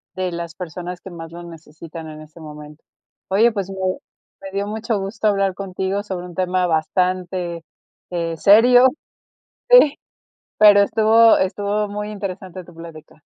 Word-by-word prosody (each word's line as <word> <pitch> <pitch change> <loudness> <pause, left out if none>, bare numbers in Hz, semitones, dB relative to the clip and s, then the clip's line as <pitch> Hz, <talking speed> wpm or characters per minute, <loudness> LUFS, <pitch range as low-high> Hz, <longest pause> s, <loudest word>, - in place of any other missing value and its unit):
de 185 -1 -3
las 170 -1 -6
personas 180 +1 -7
que 190 - -11
más 165 -2 -10
lo 170 +1 -9
necesitan 165 0 -11
en 155 0 -10
ese 155 +2 -15
momento. 150 0 -12 0.5
Oye, 220 +5 +3
pues, 195 -3 -4
me 195 - -8 0.6
me 195 0 -9
dio 200 +1 -3
mucho 220 0 -3
gusto 200 +3 -3
hablar 195 -2 +1
contigo 190 +1 -4
sobre 185 -3 -6
un 175 -1 -11
tema 185 0 0
bastante, 175 +1 -2 0.5
eh, 170 -2 -3
serio. 245 +8 +6 0.8
Sí. - - +6 0.6
Pero 205 -1 +7
estuvo 220 +2 +4
estuvo 205 +2 -1
muy 210 +1 -5
interesante 190 -3 -7
tu 175 - -17
plática. 165 -2 -13
185 Hz, 150 wpm, -20 LUFS, 170-205 Hz, 0.8 s, Pero